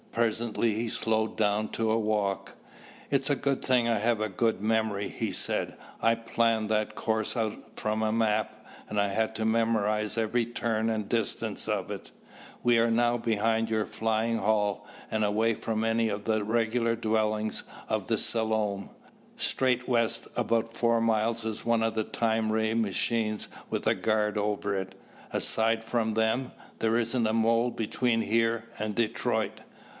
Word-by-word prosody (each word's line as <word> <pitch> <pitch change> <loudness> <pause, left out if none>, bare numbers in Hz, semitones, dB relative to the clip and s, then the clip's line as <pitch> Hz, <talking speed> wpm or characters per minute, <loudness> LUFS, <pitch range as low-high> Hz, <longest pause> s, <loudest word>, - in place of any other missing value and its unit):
Presently 115 0 0
he 115 +2 -2
slowed 110 0 0
down 105 0 +1
to 115 -1 -1
a 110 - +3
walk. 105 -3 -1 0.6
"It's 140 +1 +2
a 145 - +3
good 140 -1 -1
thing 125 -2 +3
I 115 -2 +2
have 115 +1 +1
a 110 - 0
good 110 +2 0
memory," 110 -1 0
he - - -3
said. - - 0 0.3
"I 115 0 +4
planned 115 -1 +1
that 110 0 0
course 110 +2 -1
out 110 -2 0 0.2
from 110 0 -1
a 110 - +1
map, 110 -1 0 0.2
and 105 - -1
I 100 - +3
had 110 +2 -1
to 110 0 -1
memorize 110 -1 +1
every 115 +1 +1
turn 115 -1 -1
and 110 -2 -2
distance 115 -2 -1
of - - -1
it. - - -7 0.5
We 120 -1 +4
are 115 +1 +3
now 120 +1 +3
behind 115 0 +1
your 110 -1 +1
flying 110 +1 0
hall 105 -3 +1 0.2
and 110 0 0
away 110 +2 +2
from 110 0 -2
any 115 0 +2
of 100 0 -4
the 110 -1 +1
regular 115 +1 +1
dwellings 110 -1 0 0.2
of - - -1
the - - +1
Selom. 110 -3 0 0.5
Straight 125 -1 +2
west 115 -1 0
about 115 -1 0
four 115 0 +2
miles 115 0 +1
is 110 -1 -3
one 115 -1 +2
of 115 0 +1
the 110 0 0
time 110 0 0
ray 110 0 +1
machines 110 0 0 0.2
with - - -2
a - - +4
guard 105 -1 +1
over 105 -1 -1
it. 95 0 -4 0.4
Aside 115 0 +1
from 115 -2 0
them, 110 +4 +1 0.3
there 115 0 +2
isn't 115 0 +1
a 110 - 0
mole 115 +2 +3
between 115 +1 0
here 115 +1 +1
and 110 0 -2
Detroit." 115 0 -1
110 Hz, 165 wpm, -28 LUFS, 110-115 Hz, 0.6 s, I